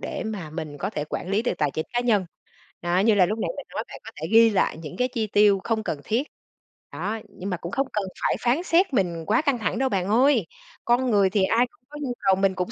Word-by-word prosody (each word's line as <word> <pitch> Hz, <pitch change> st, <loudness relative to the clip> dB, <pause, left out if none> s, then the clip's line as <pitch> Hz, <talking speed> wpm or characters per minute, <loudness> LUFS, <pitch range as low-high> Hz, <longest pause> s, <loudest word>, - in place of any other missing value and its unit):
để -, -, -4 dB
mà 195 Hz, -8 st, -5 dB
mình 155 Hz, -2 st, -6 dB
có 195 Hz, +6 st, -2 dB
thể 150 Hz, -7 st, -3 dB
quản 175 Hz, -, -5 dB
lý 205 Hz, +3 st, +1 dB
được 240 Hz, -, 0 dB
tài 150 Hz, -2 st, +1 dB
chính 155 Hz, +3 st, -4 dB
cá 240 Hz, -, +1 dB
nhân. 220 Hz, -6 st, +2 dB, 0.6 s
Đó, 175 Hz, +1 st, +1 dB
như 215 Hz, +2 st, +4 dB
là 185 Hz, -, +5 dB
lúc 215 Hz, +5 st, -2 dB
nãy -, -, -1 dB
mình -, -, -6 dB
nói, -, -, -4 dB
bạn -, -, -10 dB
có -, -, -9 dB
thể -, -, -2 dB
ghi 230 Hz, 0 st, +7 dB
lại 195 Hz, -6 st, +1 dB
những 155 Hz, -3 st, -8 dB
cái 250 Hz, +1 st, +2 dB
chi 230 Hz, -4 st, -2 dB
tiêu 205 Hz, -1 st, +4 dB
không 220 Hz, -1 st, -1 dB
cần 155 Hz, -, -3 dB
thiết, 245 Hz, +7 st, -1 dB, 0.7 s
đó. 220 Hz, +2 st, -3 dB
Nhưng 190 Hz, +2 st, -7 dB
mà 180 Hz, -, -2 dB
cũng 170 Hz, +1 st, -7 dB
không 275 Hz, +3 st, 0 dB
cần 210 Hz, -2 st, -1 dB, 0.2 s
phải -, -, +2 dB
phán 250 Hz, +8 st, +1 dB
xét 350 Hz, -3 st, +2 dB
mình 170 Hz, -6 st, 0 dB
quá 215 Hz, -, +3 dB
căng 280 Hz, -5 st, +1 dB
thẳng 225 Hz, -, -1 dB
đâu 265 Hz, -, +2 dB
bạn 190 Hz, -4 st, -1 dB
ơi. 240 Hz, -, +3 dB, 0.4 s
Con 245 Hz, +1 st, +2 dB
người 200 Hz, -3 st, +4 dB
thì 195 Hz, 0 st, +1 dB
ai 230 Hz, +5 st, +3 dB
cũng -, -, -31 dB
có 295 Hz, -, -9 dB
nhu 255 Hz, -3 st, -2 dB
cầu, 195 Hz, -1 st, +3 dB
mình 195 Hz, 0 st, +1 dB
cũng 180 Hz, +4 st, -2 dB
210 Hz, 270 wpm, -25 LUFS, 185-240 Hz, 0.7 s, ghi